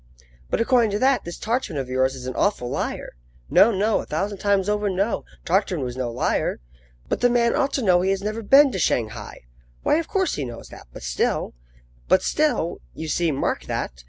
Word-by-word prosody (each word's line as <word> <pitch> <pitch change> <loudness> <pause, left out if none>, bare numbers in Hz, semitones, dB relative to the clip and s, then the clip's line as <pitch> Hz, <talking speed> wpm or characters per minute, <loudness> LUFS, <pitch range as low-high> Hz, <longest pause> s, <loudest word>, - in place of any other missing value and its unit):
"But - - 0
according 235 -1 +3
to - - +1
that, 265 +1 +2
this 170 - -6
Tartarin 225 - -2
of 135 -2 -3
yours 130 +1 +1
is 125 -1 -8
an 130 - -4
awful 200 -10 0
liar." - - -3 0.4
"No, 225 - +7
no, 210 +2 +1
a - - -5
thousand 195 +6 -2
times 200 -1 +1
over, 210 0 0
no! 195 +4 -1 0.2
Tartarin 180 -4 +1
was 125 -1 -4
no 130 -2 -2
liar." 120 +1 -1 0.5
"But - - -2
the 245 - +5
man 235 -1 +2
ought 275 - +1
to 265 - 0
know 180 -4 +4
that 180 - 0
he - - +2
has 195 0 0
never 215 +2 -3
been 275 +5 +6
to 190 - -3
Shanghai" 115 -9 -2 0.4
"Why, - - +3
of 330 - -2
course, 380 -2 0
he 145 - -2
knows 120 -2 -8
that; - - -13
but - - -11
still" 60 -1 -1 0.5
"But - - +4
still," - - 0 0.2
you 160 - -5
see 170 0 +1
mark 135 - -2
that! - - -3
195 Hz, 215 wpm, -23 LUFS, -, 0.5 s, No